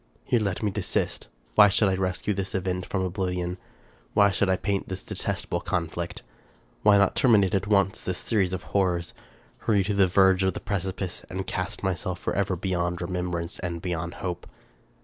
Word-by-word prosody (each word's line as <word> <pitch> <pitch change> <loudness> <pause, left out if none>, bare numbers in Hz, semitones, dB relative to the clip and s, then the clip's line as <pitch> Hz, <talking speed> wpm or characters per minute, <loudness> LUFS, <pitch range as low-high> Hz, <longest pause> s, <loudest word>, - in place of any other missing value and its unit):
Here 120 - +2
let 100 -2 -2
me 105 - +1
desist. - - -2 0.3
Why 105 +10 +8
should 105 +1 +3
I 95 - +2
rescue 95 +2 -1
this 95 0 -3
event 90 -1 -2
from 95 -1 -1
oblivion? 90 -1 -2 0.6
Why 100 -1 +6
should 95 0 +1
I 95 - +4
paint 100 0 -2
this 95 0 -5
detestable 95 -3 -3
conflict? 85 -1 -3 0.6
Why 105 -1 +6
not 100 -1 +3
terminate 105 -6 +4
at 100 0 +1
once 100 0 +2
this 90 -1 -2
series 100 -5 +1
of 95 -1 -3
horrors? 90 -3 0 0.2
— - - -31
Hurry 105 -3 +4
to 105 +2 -1
the 100 -1 +4
verge 95 0 +4
of 95 -2 +1
the - - -3
precipice, 95 -2 -3
and 95 +1 -4
cast 95 +1 -3
myself 95 -1 -1
forever 95 0 -1
be 95 +2 -4
yond 85 -1 0
remembrance 90 -1 -3
and 85 -2 -3
beyond 85 -1 -3
hope? 90 -1 -4
95 Hz, 185 wpm, -26 LUFS, 90-100 Hz, 0.6 s, Why